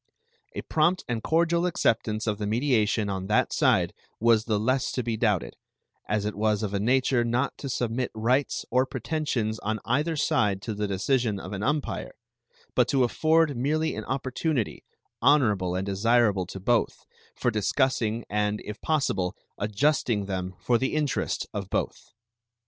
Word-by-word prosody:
A - - -4
prompt 170 +4 +1
and 120 -2 -2
cordial 170 +3 +2
acceptance 110 -9 0
of 105 -2 -1
the 105 - -2
mediation 110 -2 +1
on 95 -1 -3
that 105 - +2
side - - +2 0.3
was 115 -1 +4
the 110 -3 0
less 130 +5 +1
to 125 - -1
be 115 -1 -1
doubted, 105 -5 0 0.6
as 105 0 0
it 105 - -1
was 105 +1 0
of 105 -1 -3
a 100 - 0
nature 125 +2 +2
not 120 +4 0
to 140 - -5
submit 120 0 -1
rights 125 +6 0
or 130 +2 +3
pretensions 125 -4 -2
on 110 +1 -2
either 150 +7 +1
side 105 -9 +1
to 110 - -3
the 105 0 -2
decision 105 +2 0
of 100 - -7
an 100 - -4
umpire, 150 +5 -2 0.6
but - - +3
to 135 -2 +2
afford 155 +4 +2
merely 155 +6 0
an - - -5
opportunity, 135 -1 -2 0.4
honorable 105 -10 +3
and 95 +1 -2
desirable 100 -1 +2
to 95 - -7
both, 115 +4 0 0.3
for 120 - 0
discussing 115 +1 0
and, 105 0 0
if 105 +1 -7
possible, 135 - 0 0.2
adjusting 110 0 +1
them 95 -1 -4
for 120 -2 +2
the 130 - -1
interest 150 -3 -1
of 100 -2 -4
both. - - -3
115 Hz, 160 wpm, -26 LUFS, 105-135 Hz, 0.6 s, was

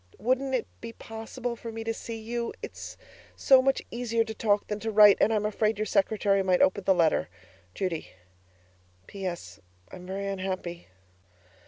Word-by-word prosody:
Wouldn't 260 +5 0
it 240 - -1 0.2
be 230 0 -7
possible 230 +2 -6
for 230 0 -8
me 225 0 -6
to 225 0 -1
see 225 0 -6
you? 235 +1 -4
It's - - -8 0.4
so 265 -1 +6
much 270 +1 +1
easier 230 -1 0
to 220 - -6
talk 210 -2 +1
than 210 0 -4
to 225 - -3
write; 210 -2 +7
and 220 - +4
I'm 215 -1 +1
afraid 215 0 0
your 215 - -1
secretary 200 0 +2
might 185 -1 +2
open 190 +1 +1
the 190 - +4
letter. 165 -3 +2 0.5
Judy 180 -4 -3 1.0
PS. 175 - -6 0.3
I'm 180 -1 -10
very 195 +1 -4
unhappy. 185 -3 -4
215 Hz, 165 wpm, -28 LUFS, 190-230 Hz, 1.0 s, write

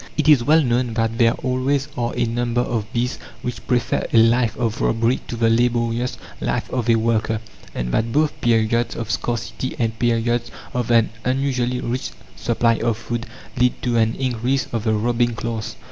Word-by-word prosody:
It - - +1
is 145 -6 +6
well 155 +4 +5
known 120 -2 0
that 115 0 0
there 115 -1 +5
always 130 +2 0
are 120 0 -1
a 120 - +2
number 120 +1 0
of 110 -3 -2
bees 125 0 -1 0.2
which 125 -3 -5
prefer 125 -2 0
a - - +3
life 115 0 +4
of 115 -2 -1
robbery 115 +3 +2
to - - -4
the 115 0 +2
laborious 120 +1 +1 0.2
life - - -1
of 125 -2 -1
a 115 - +6
worker; 110 -1 +1 0.4
and - - -2
that 115 - 0
both 150 +3 +1
periods 115 0 +2
of 115 -2 -4
scarcity 120 +2 -3
and 115 -1 -1
periods 120 0 +1 0.2
of 125 -2 -2
an 115 -2 +4
unusually 125 -1 0
rich 120 - -2 0.3
supply 115 -1 +1
of 115 -2 0
food 120 +1 -4 0.3
lead 125 0 +2
to 120 -2 +1
an 115 0 +2
increase 130 +1 0
of 115 -1 -2
the 110 - +2
robbing 120 +2 +1
class. 115 -1 -4
120 Hz, 180 wpm, -21 LUFS, 115-125 Hz, 0.4 s, is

